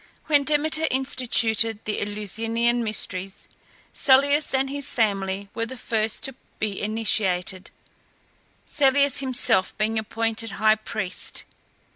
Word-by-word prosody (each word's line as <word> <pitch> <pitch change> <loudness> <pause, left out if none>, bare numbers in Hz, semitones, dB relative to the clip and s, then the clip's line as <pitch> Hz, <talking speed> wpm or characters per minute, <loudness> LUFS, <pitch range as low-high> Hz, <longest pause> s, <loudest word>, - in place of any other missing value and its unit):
When 290 -2 +3
Demeter 310 +2 +1
instituted 235 -4 +1
the 210 - -2
Eleusinian 225 +4 -1
Mysteries, 195 -3 -3 0.5
Celeus 285 +2 +4
and 265 0 +2
his 280 0 +2
family 200 -3 0
were 230 0 -3
the 260 +2 -8
first 220 -3 -2
to 270 -2 -1 0.2
be 205 -2 -3
initiated, 200 -4 -1 1.0
Celeus 280 -1 +2
himself 250 -7 +1
being 220 +1 0
appointed 225 0 -3
high 215 +1 +4
priest. 215 -3 -2
225 Hz, 110 wpm, -24 LUFS, 210-265 Hz, 1.0 s, Celeus